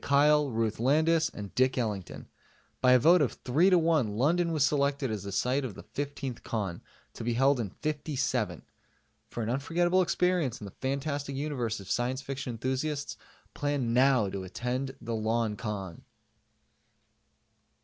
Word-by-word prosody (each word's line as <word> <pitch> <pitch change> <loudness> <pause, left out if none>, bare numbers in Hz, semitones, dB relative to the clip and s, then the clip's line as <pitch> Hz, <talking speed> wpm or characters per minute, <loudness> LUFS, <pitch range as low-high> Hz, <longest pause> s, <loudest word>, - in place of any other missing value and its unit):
Kyle, 145 +1 +4
Ruth 110 -2 -1
Landis 160 +6 +3
and 100 -2 -8
Dick 130 +1 +2
Ellington. 105 -7 -3 0.5
By 125 0 +6
a - - +8
vote 165 +7 +5
of 140 - +1
3 155 +10 +4
to 180 - +5
1, 160 -7 +2
London 170 +7 +2
was 155 -4 +3
selected 140 -3 +1
as 105 -2 -3
the 100 +1 -6
site 125 +8 0
of 115 -7 -5
the - - -10
15th 140 -3 -5
Con, 100 -6 -3 0.3
to - - -7
be 120 +1 0
held 135 +2 +3
in 110 -4 -2
'57. 140 - -2 0.7
For 120 - -4
an 110 - -3
unforgettable 175 +7 +2
experience 180 -7 +1
in 105 - -8
the 100 - -8
fantastic 140 +2 -3
universe 130 -6 -2
of 95 -1 -8
science 130 +2 -1
fiction 135 -1 -5
enthusiasts, 130 +5 -2 0.4
plan 145 -5 -1
now 130 -3 +4
to 95 0 -4
attend 125 +7 -3
the 115 0 -5
LONCON! 110 -4 -2
130 Hz, 155 wpm, -29 LUFS, 115-145 Hz, 0.7 s, a